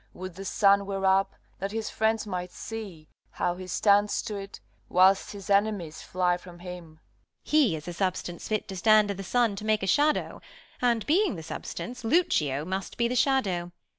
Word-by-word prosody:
Would 185 0 -7
the 195 +3 -8
sun 200 -1 +3
were 195 -1 -2
up, 190 +1 +3 0.2
that 195 +1 -3
his 220 0 -3
friends 220 0 +1
might 180 -3 -4
see 200 -9 -8 0.3
How 175 - 0
he 185 +1 -9
stands 205 +3 +3
to't, 200 -3 -6 0.3
whilst 190 +2 +4
his 200 -2 -9
enemies 200 -6 +1
fly 180 -1 0
from 175 -1 -13
him. 175 -3 -10 0.5
Beat. - - -12
He 290 - +4
is 155 +1 -8
a 175 - -4
substance 180 -1 -3
fit 215 -1 -1
to 190 - -5
stand 215 +2 +4
i' - - -1
th' 195 0 -7
sun 230 +2 +2
To 210 - -6
make 215 -1 +1
a - - +1
shadow. 295 - +1 0.4
And, 235 -3 +2
being 365 - +2
the 160 - -7
substance, 245 +9 -6
Lucio 155 - +1
must 190 +2 -4
be 235 - +2
the 250 - -2
shadow 220 -10 +1
195 Hz, 190 wpm, -27 LUFS, 180-220 Hz, 0.5 s, whilst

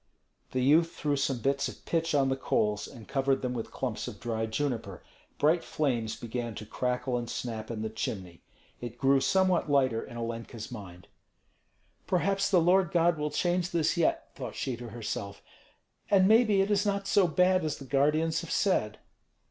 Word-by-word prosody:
The 130 -1 -1
youth 160 +5 +4
threw 145 -2 0
some 135 -3 -1
bits 140 +2 +1
of - - -10
pitch 165 -2 0
on 135 -2 +3
the 130 - +1
coals 105 -5 0
and 115 -4 -12
covered 135 -1 0
them 125 -1 -1
with 115 -2 -4
clumps 120 -5 -4
of - - -8
dry 110 -1 -2
juniper. 110 -6 -3 0.3
Bright 160 +3 +3
flames 120 -7 -1
began 120 -1 -5
to 105 - -7
crackle 125 +2 -1
and 120 -1 -6
snap 110 -3 -4
in 110 -2 -4
the 110 - -2
chimney. 95 -5 -5 0.4
It 120 -1 -7
grew 135 +2 +4
somewhat 185 -2 +2
lighter 130 -5 +2
in 120 - -9
Olenka's 115 0 -5
mind. 90 -7 -9 1.0
"Perhaps 195 +2 +1
the 185 - +5
Lord 180 +2 +4
God 170 -2 +2
will 150 0 -1
change 175 +2 0
this 170 -3 +1
yet," 170 -2 0
thought 125 -5 -6
she 130 -3 -2
to 120 -1 -8
herself, 105 -3 -5 0.7
"and 190 -2 +5
maybe 215 -2 +5
it 195 +2 0
is 205 -1 +3
not 200 -1 -1
so 195 -2 +4
bad 180 +2 +3
as 155 -2 -2
the 135 - -10
guardians 150 +4 +2
have 170 - -9
said." 105 - +1
135 Hz, 180 wpm, -29 LUFS, 115-170 Hz, 1.0 s, the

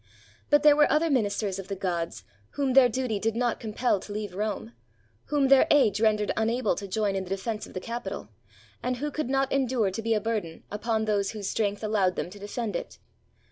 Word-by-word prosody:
But 290 0 +4
there 300 -1 +7
were 295 0 +4
other 315 +1 +2
ministers 205 -5 0
of 195 - -7
the 195 - -3
gods, 175 -3 -3 0.3
whom 275 -3 0
their 260 -2 +7
duty 235 -3 -1
did 225 +1 -1
not 240 -1 0
compel 220 -1 0
to 205 - -10
leave 205 -2 -4
Rome, 205 - -3 0.5
whom 290 -2 +2
their 275 -1 +6
age 220 -8 +4
rendered 215 -2 +2
unable 225 +1 +1
to 200 - -5
join 200 0 0
in 190 - -1
the 180 - -10
defense 210 +3 -3
of - - -15
the - - -1
Capitol, 235 +5 -5 0.5
and 250 0 -1
who 295 +3 -3
could 305 -3 -3
not 270 0 +1
endure 250 -7 +1
to 210 - -4
be 225 0 +1
a - - +2
bur 225 +1 0
den 165 -4 -12
upon 220 +1 -1
those 200 -2 +1
whose 205 -3 -4
strength 205 -1 -1
allowed 200 -4 +1
them 175 - -4
to 205 - -11
defend 205 0 -4
it. - - -5
220 Hz, 220 wpm, -27 LUFS, 200-250 Hz, 0.5 s, there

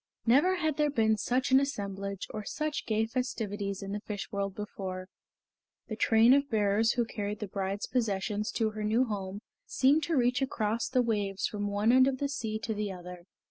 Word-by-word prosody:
Never 285 +11 +4
had 315 -5 -1
there 300 -1 +3
been 220 -5 +2
such 250 +5 0
an 265 - +7
assemblage 200 -7 -3
or 215 - -5
such 305 +7 -3
gay 220 0 +1
festivities 210 -5 -3
in 195 - -5
the 205 - -2
Fish 210 -1 -6
World 200 -1 -2
before. 190 -3 -6 0.8
The 220 - -3
train 225 +2 +5
of 280 0 +2
bearers 215 0 +2
who 240 -1 +1
carried 210 -2 -4
the 210 - -5
bride's 195 +1 -3
possessions 210 -2 -1
to 220 -1 0
her 215 0 -5
new 225 +5 +2
home 200 -3 -4 0.3
seemed 275 +4 +3
to 330 -3 0
reach 250 +1 +2
across 230 -3 -1
the 255 -1 +2
waves 205 -4 -1
from 205 -1 -2
one 205 +3 +2
end 260 +1 +6
of 270 -1 0
the 280 +1 -1
sea 225 -6 -3
to 225 - -1
the 210 -1 -2
other. 180 -1 -9
215 Hz, 195 wpm, -30 LUFS, 200-255 Hz, 0.8 s, an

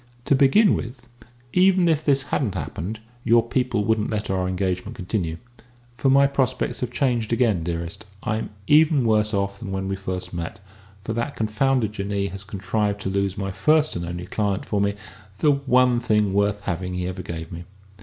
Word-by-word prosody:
To - - +3
begin 140 +10 +5
with, 120 0 -5 0.5
even 185 -1 +4
if 160 -2 +2
this 140 -2 +3
hadn't 110 -9 0
happened, 95 +4 -5 0.2
your 115 0 +4
people 120 -4 0
wouldn't 110 -1 +1
let 105 -2 -2
our 95 -1 0
engagement 95 +3 -2
continue. 90 -5 -2 0.6
For 120 +3 0
my 140 +1 +6
prospects 130 -2 0
have 125 -1 -3
changed 120 -4 0
again, 115 -8 +2
dearest. 85 +1 -4 0.2
I'm 110 +1 -2 0.2
even 150 0 +5
worse 110 -1 +2
off 100 -1 -1
than 110 -5 -6
when 95 0 -2
we 95 - -1
first 95 -2 -5
met, 85 +2 -5 0.4
for 110 - -3
that 120 +5 -2
confounded 110 +1 +1
Jinnee 100 -1 -2
has 100 +1 -7
contrived 100 +1 -2
to 95 - -2
lose 100 0 -1
my 95 -1 -2
first 155 +9 +2
and 85 - -3
only 85 +1 -5
client 100 0 -1
for 105 -2 0
me 100 0 +1 0.4
the 150 +7 +4
one 125 -3 +3
thing 105 -4 +1
worth 100 +1 +1
having 90 0 -3
he 90 0 -2
ever 95 +1 -4
gave 80 -2 -7
me." 85 +1 -7
105 Hz, 185 wpm, -23 LUFS, 95-125 Hz, 0.6 s, my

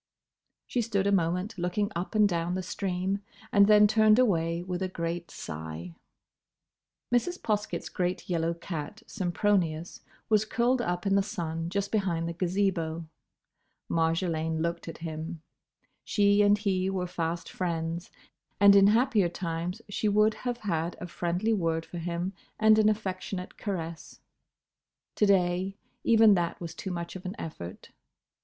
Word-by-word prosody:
She 245 - -1
stood 205 -4 0
a 200 - +3
moment 180 +3 0
looking 200 +4 0
up 175 +6 -4
and 210 -1 +6
down 175 -1 -1
the 185 - -2
stream, 190 +1 -2 0.3
and 200 -1 +6
then 210 0 +7
turned 215 +1 +5
away 170 -8 +2
with 180 0 -4
a 190 - 0
great 170 -1 -4
sigh. 80 +2 -7 1.2
Mrs. 350 +10 +1
Poskett's 210 -1 -2
great 180 -1 -2
yellow 170 -1 0
cat, 170 +4 -6
Sempronius, 175 -4 0 0.3
was 215 -1 +4
curled 240 +3 +1
up 175 -4 -2
in 195 - +2
the 200 - +4
sun 165 -5 -3
just 200 +2 -2
behind 180 -6 0
the 170 - -3
Gazebo. 175 -2 -1 0.9
Marjolaine 165 -1 0
looked 170 0 -3
at 165 - -6
him. 160 +1 -5 0.6
She 205 0 +3
and 205 0 +5
he 190 -2 0
were 190 -2 -1
fast 170 -1 -3
friends, 170 -1 -3 0.5
and 200 0 +8
in 200 0 +7
happier 220 -4 +3
times 175 +4 -4
she 210 +1 0
would 210 +1 +4
have 245 +1 -3
had 170 -2 -1
a - - -5
friendly 180 +6 -1
word 165 -5 0
for 175 - -7
him 175 +2 -3 0.3
and 220 0 +6
an 215 0 +5
affectionate 190 -3 -3
caress. 170 -5 -5 1.0
To 210 - +4
day, 190 0 +2 0.3
even 225 -2 +6
that 175 -3 0
was 170 -2 -6
too 190 - -6
much 170 -1 -5
of 185 - -7
an 185 +2 -5
effort. 90 - -8
180 Hz, 150 wpm, -28 LUFS, 170-205 Hz, 1.2 s, and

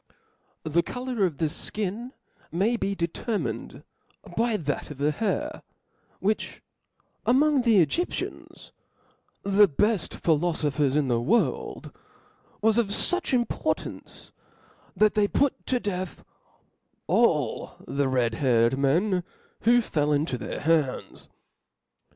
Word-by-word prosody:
The 160 +2 +2
colour 245 +1 -2
of" 155 -5 -7
the 165 - 0
flcin 210 +8 -4 0.4
may 200 +8 +1
be 200 -3 -1
determined 195 +5 -3 0.5
by 230 -1 +1
that 145 -5 -3
of 150 - -8
the 145 +2 +1
hair, 210 +5 -2 0.6
which 210 +2 -2 0.6
among 280 +2 +4
the 220 -8 +5
flEgyptians, 350 - -4 0.7
the 200 +1 +5
befl: 205 +5 0
philofophers 150 -4 +1
in 150 -2 +2
the 120 -2 +1
world, 215 - 0 0.7
was 225 +1 +4
of 230 - +2
fuch 360 - 0
importance, 245 -2 -2 0.6
that 215 0 +4
they 210 -1 +3
put 280 +5 0
to 250 - +1
death 185 -4 -4 0.8
all - - +1
the 140 0 0
red 125 -3 +1
haired 120 0 +2
men 175 +7 +2 0.4
who 240 +1 +6
fell 150 -8 0
into 145 -1 +1
their 125 - -5
hands. 155 -4 0
185 Hz, 115 wpm, -26 LUFS, 150-225 Hz, 0.8 s, who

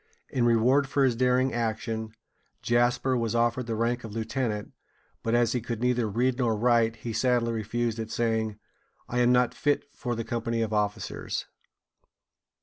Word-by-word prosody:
In 125 -3 +1
reward 125 +4 +4
for 140 0 +2
his 125 -3 +2
daring 125 +1 +2
action, 110 -1 -3 0.5
Jasper 120 +2 +2
was 115 -2 -1
offered 120 +1 +1
the 115 - -1
rank 120 +2 0
of 110 -2 -7
lieutenant; 110 -1 -2 0.5
but 115 +1 0
as 120 -1 +3
he 125 - -1
could 115 -1 -4
neither 125 -2 +1
read 125 +5 0
nor 115 -3 +2
write, 115 0 +3
he 115 0 -6
sadly 120 0 +2
refused 115 +1 -2
it, 110 -1 -4
saying: 110 -2 -1 0.5
"I 125 - -1
am 125 0 +4
not 125 -1 +3
fit 145 0 +1
for 120 -2 -3
the 115 - -3
company 115 0 -1
of 110 -1 -3
officers." 105 -1 -2
115 Hz, 165 wpm, -27 LUFS, 115-125 Hz, 0.5 s, reward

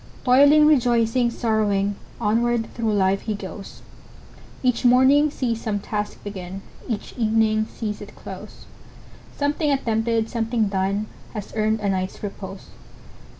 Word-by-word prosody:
Toiling,—rejoicing,—sorrowing, 240 -7 +3 0.3
Onward 230 +2 +1
through 225 -2 -1
life 195 -1 +2
he 215 - -3
goes; 195 0 -9 0.8
Each 250 -2 +1
morning 260 +4 +5
sees 235 -5 -2
some 215 -3 -1
task 210 +1 -4
begin, 195 -1 -7 0.2
Each 220 -4 -4
evening 220 -1 +2
sees 210 -2 -5
it - - -10
close; - - -10 0.7
Something 295 +2 0
attempted, 225 -4 +1
something 225 -2 0
done. 195 +2 0 0.3
Has 210 -2 -6
earned 215 0 +1
a 200 - 0
night's 185 +1 -3
repose. 195 -1 -7
220 Hz, 115 wpm, -23 LUFS, 205-240 Hz, 0.8 s, morning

